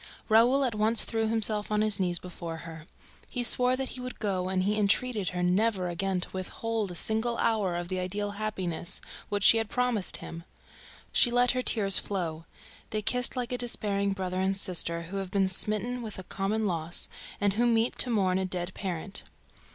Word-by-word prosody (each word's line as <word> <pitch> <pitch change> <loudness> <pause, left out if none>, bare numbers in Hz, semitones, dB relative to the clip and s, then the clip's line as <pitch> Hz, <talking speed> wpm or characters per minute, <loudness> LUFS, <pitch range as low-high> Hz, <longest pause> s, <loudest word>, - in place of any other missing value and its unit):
Raoul 240 +5 +5
at 250 -3 0
once 215 +2 +2
threw 225 -1 -1
himself 220 -1 +1
on 210 0 +2
his 215 -1 +2
knees 175 -2 +2
before 170 -2 -7
her. 165 -1 -10 0.4
He 245 - -2
swore 250 +1 +7
to - - +3
her - - 0
that 265 0 -3
he 255 - -7
would 250 0 -7
go 185 -4 -1
and 185 -1 0
he 205 +2 +1
entreated 210 0 +1
her 180 0 -3
never 185 0 +1
again 185 +2 -1
to - - -3
withhold 215 +3 -3
a - - -8
single 220 +6 -2
hour 210 -6 +1
of 175 0 -4
the 185 0 -2
ideal 205 +3 -2
happiness 190 -5 -3 0.3
which 205 -1 -1
she 225 - +7
had 220 -1 -2
promised 250 -6 0
him. 165 0 -9 0.7
She 245 - +4
let 245 +1 +3
her 255 - -1
tears 200 -6 +6
flow. 165 -5 -4 0.4
They 215 -1 -2
kissed 250 +4 +2
like 245 -2 -3
a 250 - -2
despairing 200 -4 -1
brother 185 -1 -3
and 190 +1 0
sister 170 -3 -2
who 180 +4 -6
have 195 -1 -4
been 195 0 +1
smitten 215 +6 -1
with 220 -3 -7
a 190 - -7
common 200 +4 -2
loss 170 -3 -2 0.3
and 205 -1 +1
who 240 +4 +2
meet 230 0 +1
to 250 - +5
mourn 190 -5 +1
a 190 - -1
dead 180 0 -3
parent. 190 +1 -4
205 Hz, 205 wpm, -28 LUFS, 185-225 Hz, 0.7 s, swore